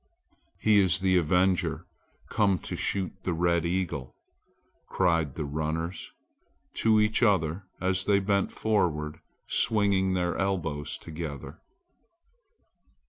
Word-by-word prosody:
"He 105 -1 +4
is 95 -3 +3
the 95 -1 +3
avenger 90 +2 +1 0.4
come 100 -4 +2
to - - -6
shoot 95 -2 -1
the 90 - -2
red 85 0 +1
eagle," 85 -7 -3 0.7
cried 85 -6 +1
the 75 - -3
runners 80 +4 -3 0.7
to 110 -1 +4
each 105 +1 +2
other 95 -4 +2
as 95 0 +1
they 100 -1 +3
bent 100 0 0
forward 80 -8 -1 0.3
swinging 100 -3 +2
their 90 -1 0
elbows 80 -7 -2
together. 75 -4 -7
90 Hz, 110 wpm, -27 LUFS, 80-100 Hz, 0.7 s, He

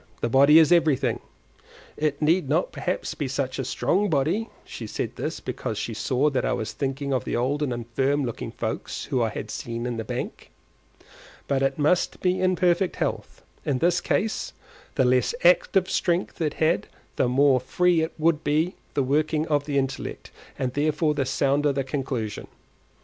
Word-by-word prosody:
The 120 - 0
body 140 +5 +6
is 160 -1 +6
everything: 140 -8 +3 0.8
it 150 -2 -1
need 160 -1 +2
not 160 +5 +1
perhaps 180 - -3
be 145 - -3
such 130 0 -2
a - - 0
strong 195 - 0
body 165 - 0 0.2
(she - - -7
said - - -4
this - - -4
because - - -4
she - - -3
saw 140 +3 +1
that 130 - 0
I - - +1
was 110 -1 -3
thinking 140 +1 -2
of 130 - 0
the - - -3
old 135 +5 0
and 145 -4 0
infirm 130 +4 0
looking 120 - -5
folks - - -4
whom 130 - 0
I 115 - +2
had - - -6
seen 115 0 -4
in 120 -1 -3
the 110 - -3
bank), - - -5 1.0
but 135 -1 +1
it 135 0 +1
must 155 +4 +1
be 185 0 +1
in 185 0 +3
perfect 180 0 +2
health; - - -3 0.2
in 135 - 0
this 175 +5 +2
case, 220 +1 -1 0.4
the 130 - +3
less 125 - +2
active 185 +1 +4
strength 175 0 -1
it 155 -2 0
had 160 +2 +1 0.3
the - - +2
more 135 0 +4
free 165 +5 +2
would 160 -1 +2
be 155 +5 +1 0.2
the 140 - +2
working 155 +3 +1
of 145 -1 +1
the 145 -2 -1
intellect, 135 -1 -3 0.3
and 125 -2 -2
therefore 150 +2 +1
the 140 -2 -1
sounder 140 +2 +2
the 135 0 -1
conclusion. 130 -5 -3
145 Hz, 180 wpm, -25 LUFS, 130-160 Hz, 1.0 s, body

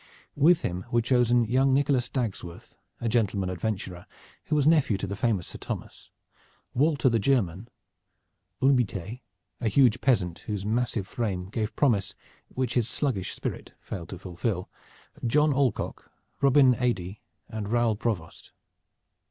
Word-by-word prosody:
With 160 +4 +5
him 90 +1 -3
were 120 0 +2
chosen 120 -1 +3
young 130 +4 +3
Nicholas 135 -3 +1
Dagsworth, 100 -9 -5 0.2
a 120 - -2
gentleman 100 -5 +1
adventurer 90 -2 -4 0.4
who 155 - 0
was 145 -2 +2
nephew 150 -9 +4
to 95 - -3
the 100 +1 -4
famous 105 -4 0
Sir - - -8
Thomas, - - -7 0.6
Walter 145 0 +2
the 115 -2 +3
German, 110 -4 0 0.9
Hulbitee 125 -4 +1 0.4
a 120 - -1
huge 120 +1 +4
peasant 90 -10 +1
whose 105 -3 -3
massive 115 -2 0
frame 95 -6 -3
gave 110 0 -3
promise 100 -8 +1 0.3
which 130 -1 -2
his 120 -2 +1
sluggish 125 -11 -2
spirit - - -5
failed 85 -3 -7
to 95 - -6
fulfil 90 +1 -3 0.6
John 150 +4 +3
Alcock, 130 -4 -1 0.3
Robin 135 -1 +6
Adey 110 -6 -2 0.3
and 110 -1 -5
Raoul 120 -2 +2
Provost. 100 -7 -4
115 Hz, 135 wpm, -27 LUFS, 100-130 Hz, 0.9 s, Robin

